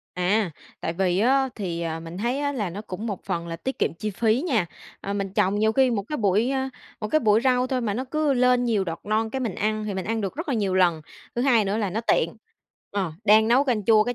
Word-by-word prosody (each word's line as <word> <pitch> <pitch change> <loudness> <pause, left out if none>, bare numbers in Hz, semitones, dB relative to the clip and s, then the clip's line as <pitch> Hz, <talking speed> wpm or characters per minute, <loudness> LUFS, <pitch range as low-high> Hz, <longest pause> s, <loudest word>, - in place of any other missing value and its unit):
À, 185 +1 +1 0.3
tại 165 - -2
vì 185 0 +1
á, 265 +4 +3
thì 170 -5 -3 0.2
mình 165 +2 -8
thấy 240 +5 -1
á, 285 0 0
là 210 -9 -2
nó 200 +4 -6
cũng 210 +2 -6
một 200 -4 -4
phần 170 0 -3
là 165 0 -5
tiết 265 +10 -4
kiệm - - 0
chi 210 +2 -2
phí 225 - +1
nha. 220 - +1 0.3
Ờ, 200 - -4
mình 195 -1 -3
trồng 200 +2 +2
nhiều 220 +1 +3
khi 260 0 +3
một 205 -4 0
cái 300 - -2
bụi, 210 +4 +2
ơ 265 -1 -1 0.3
một 215 - -3
cái 310 - +3
bụi 215 -1 +4
rau 250 0 +2
thôi 255 -1 -1
mà 210 -4 -1
nó 255 +3 -2
cứ 305 +1 0
lên 250 0 +3
nhiều 215 -5 +1
đọt 165 -1 -4
non, 220 +1 0
cái 265 - -3
mình 225 -7 -2
ăn, 215 +1 -1
thì 205 -2 -3
mình 190 - -3
ăn 225 0 -1
được 195 +2 -3
rất 325 -1 -5
là 265 - +1
nhiều 200 -4 0
lần. 175 -4 +3 0.3
Thứ 240 - 0
hai 240 -6 +4
nữa 200 +2 -1
là 205 -4 -1
nó 220 +5 -2
tiện. 170 -5 +1 0.5
Ờ, 190 -5 -2
đang 220 +1 +6
nấu 260 +4 +4
canh 225 -7 0
chua 215 -1 +5
cái 245 0 -2
215 Hz, 265 wpm, -25 LUFS, 195-250 Hz, 0.5 s, đang